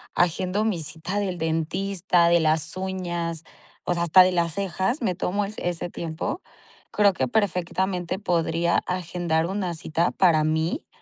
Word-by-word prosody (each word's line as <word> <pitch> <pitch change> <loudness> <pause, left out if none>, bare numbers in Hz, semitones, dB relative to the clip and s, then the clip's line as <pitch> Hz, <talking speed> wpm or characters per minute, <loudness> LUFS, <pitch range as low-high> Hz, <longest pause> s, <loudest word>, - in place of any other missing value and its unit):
agendo 185 +4 +1
mi 195 -7 0
cita 160 +6 -3
del 185 -3 -2
dentista, 170 +2 +1
de 170 0 +5
las 160 +1 +1
uñas, 175 -3 -3 0.4
o - - 0
sea, 170 0 -1
hasta 180 +2 +7
de 185 - +2
las 170 -3 0
cejas. 195 - -1
Me 185 - +1
tomo 200 +3 -1
es 205 +2 -8
ese 175 0 -3
tiempo. 165 - -4 0.5
Creo 205 -2 +4
que 130 -7 -1
perfectamente 185 - -1
podría 170 -3 +1
agendar 175 -3 -1
una 185 -1 -2
cita 165 +1 0
para 165 -5 +3
mí, 160 - -1
175 Hz, 155 wpm, -24 LUFS, 165-190 Hz, 0.5 s, hasta